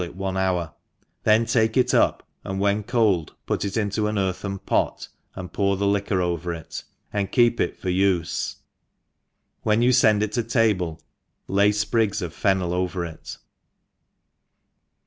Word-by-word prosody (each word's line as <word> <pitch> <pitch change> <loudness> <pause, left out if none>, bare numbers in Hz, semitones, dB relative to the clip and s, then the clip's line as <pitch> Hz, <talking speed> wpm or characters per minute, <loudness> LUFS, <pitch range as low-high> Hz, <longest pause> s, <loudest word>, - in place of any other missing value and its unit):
it 85 - -8
'one 95 0 -3
hour, 90 -3 0 0.5
then 110 +1 +4
take 110 -1 +1
it 125 -1 +3
up, - - +2 0.2
and 95 0 -4
when 100 +1 +1
hoM, 105 -10 +2 0.2
pift - - -1
it 100 +2 -3
into 105 0 0
ah 105 - -2
earthen 95 +1 -2
pot, - - -1 0.3
and 90 -1 -8
pour 100 -1 +1
the 100 - -1
liquor 100 -2 +1
oVer 85 0 -2
it^ 80 - -8 0.3
ahd 100 -2 -1
keep 120 -2 +3
it - - -1
for 95 - -4
Ufe; 90 -2 0 1.1
v^hen 110 +2 +2
yoii 125 0 +5
fend 110 -1 +4
it 105 - -2
to 120 - 0
table 105 -8 0 0.5
lay 100 +2 +3
fprig^ 105 +1 +1
bf 90 -5 -3
fertiiel 95 -2 0
over 90 0 -1
it. 80 -2 -9
100 Hz, 155 wpm, -24 LUFS, 90-110 Hz, 1.1 s, yoii